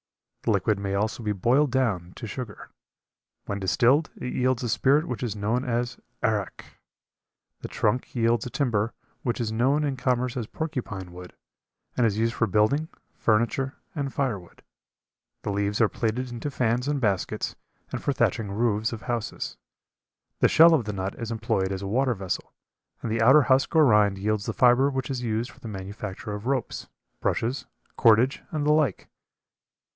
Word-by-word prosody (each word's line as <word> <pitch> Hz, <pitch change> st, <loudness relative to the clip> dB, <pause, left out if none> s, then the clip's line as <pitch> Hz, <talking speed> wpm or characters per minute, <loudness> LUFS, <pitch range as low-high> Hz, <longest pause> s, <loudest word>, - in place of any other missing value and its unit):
The -, -, -2 dB
liquid 105 Hz, -2 st, +1 dB
may 100 Hz, 0 st, -2 dB
also 110 Hz, +4 st, -1 dB
be 105 Hz, -2 st, -1 dB
boiled 125 Hz, +9 st, +3 dB
down 105 Hz, -9 st, 0 dB
to 120 Hz, -, -7 dB
sugar. 110 Hz, 0 st, -7 dB, 0.7 s
When 100 Hz, -, -3 dB
distilled 130 Hz, -, +3 dB
it 125 Hz, -, -5 dB
yields 130 Hz, -1 st, +1 dB
a 120 Hz, -, -1 dB
spirit 145 Hz, +8 st, +3 dB
which 125 Hz, -, -4 dB
is 115 Hz, -5 st, -2 dB
known 110 Hz, +5 st, 0 dB
as 120 Hz, -1 st, -2 dB, 0.2 s
"arrack." 105 Hz, -5 st, -2 dB, 0.8 s
The -, -, -6 dB
trunk 125 Hz, +5 st, -1 dB
yields 115 Hz, 0 st, +2 dB
a -, -, -5 dB
timber 115 Hz, -5 st, 0 dB, 0.3 s
which 120 Hz, -1 st, -2 dB
is 115 Hz, -2 st, -1 dB
known 130 Hz, +7 st, +2 dB
in 140 Hz, -2 st, -1 dB
commerce 125 Hz, 0 st, 0 dB
as 120 Hz, -4 st, -3 dB
porcupine 115 Hz, -, -5 dB
wood, 90 Hz, 0 st, -10 dB, 0.6 s
and 120 Hz, -2 st, +3 dB
is 105 Hz, -1 st, -1 dB
used 115 Hz, +1 st, +1 dB
for 115 Hz, -, +1 dB
building, 110 Hz, -, +2 dB, 0.3 s
furniture, 120 Hz, +5 st, +1 dB, 0.2 s
and 140 Hz, -4 st, -3 dB
firewood; 110 Hz, -12 st, -3 dB, 0.8 s
the 105 Hz, -, -2 dB
leaves 100 Hz, +1 st, -1 dB
are 115 Hz, -, +5 dB
plaited 120 Hz, +4 st, -2 dB
into 120 Hz, +4 st, -4 dB
fans 125 Hz, -1 st, 0 dB
and 145 Hz, -1 st, 0 dB
baskets, 100 Hz, -7 st, -1 dB, 0.4 s
and -, -, -3 dB
for -, -, 0 dB
thatching 115 Hz, -5 st, 0 dB
roofs 110 Hz, 0 st, +1 dB
of 115 Hz, -2 st, -7 dB
houses; 120 Hz, -3 st, -3 dB, 0.8 s
the -, -, +5 dB
shell 165 Hz, +1 st, +7 dB
of 140 Hz, -9 st, +2 dB
the 105 Hz, -, -3 dB
nut 95 Hz, 0 st, -3 dB
is 115 Hz, -2 st, -4 dB
employed 110 Hz, -4 st, -1 dB
as 95 Hz, 0 st, -4 dB
a -, -, -3 dB
water 125 Hz, +4 st, +1 dB
vessel, 95 Hz, -2 st, -4 dB, 0.5 s
and 115 Hz, -, -2 dB
the 115 Hz, 0 st, 0 dB
outer 135 Hz, +6 st, +7 dB
husk 130 Hz, +4 st, +2 dB
or 155 Hz, -1 st, +7 dB
rind 105 Hz, -5 st, +4 dB
yields 105 Hz, +1 st, -1 dB
the -, -, -1 dB
fiber 125 Hz, +2 st, +5 dB
which 130 Hz, -2 st, -3 dB
is 130 Hz, -2 st, -3 dB
used 115 Hz, 0 st, -2 dB
for -, -, -19 dB
the -, -, -9 dB
manufacture 100 Hz, 0 st, -6 dB
of 105 Hz, +3 st, -6 dB
ropes, 135 Hz, -3 st, -2 dB, 0.3 s
brushes, 120 Hz, +4 st, -1 dB, 0.3 s
cordage 115 Hz, +3 st, +4 dB
and 150 Hz, -2 st, -2 dB
the 150 Hz, -, +4 dB
like. 155 Hz, -3 st, +1 dB
115 Hz, 175 wpm, -26 LUFS, 105-130 Hz, 0.8 s, shell